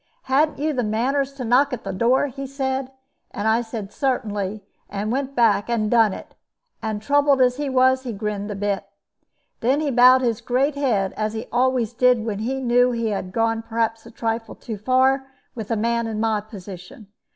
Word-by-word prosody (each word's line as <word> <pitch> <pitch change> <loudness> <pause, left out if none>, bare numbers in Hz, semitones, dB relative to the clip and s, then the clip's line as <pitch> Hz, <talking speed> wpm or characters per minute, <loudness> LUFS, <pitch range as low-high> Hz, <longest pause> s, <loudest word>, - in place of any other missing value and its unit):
'Ha'n't 285 +3 +2
you 305 +2 -1
the 250 -3 -1
manners 260 +6 0
to 275 -3 -6
knock 255 +5 +3
at 250 -3 -5
the 195 - -4
door?' 240 +8 +2
he 275 0 -6
said; 265 -1 -3 0.4
and 205 +2 -3
I 225 +2 +3
said, 225 -3 -7
'Certainly,' 210 -6 -2 0.3
and 205 +2 -3
went 275 +1 -2
back 230 -2 +3
and 215 -3 0
done 225 -3 +5
it; - - -9 0.5
and, 215 -1 -3
troubled 285 +1 +3
as 250 -1 +3
he 290 -1 -2
was, 260 0 +3
he 255 -2 -5
grinned 210 -1 -4
a 205 - -4
bit. 200 0 -1 0.8
Then 260 +5 +2
he 300 -2 -1
bowed 255 +1 +6
his 235 -4 0
great 265 +4 +1
head, 235 -9 0
as 215 0 -2
he 225 +2 -5
always 245 -2 +1
did 250 -2 +3
when 210 -3 -3
he 260 +5 -2
knew 245 -1 +3
he 230 -2 -1
had 195 -3 -3
gone 225 +2 0
perhaps 225 0 -2
a - - -10
trifle 225 0 -3
too 220 -3 -7
far 260 +4 +2 0.3
with 220 -4 -7
a 230 - +1
man 235 +1 0
in 220 -1 -4
my 220 -1 +1
position. 200 -1 -11
235 Hz, 195 wpm, -22 LUFS, 215-260 Hz, 0.8 s, bowed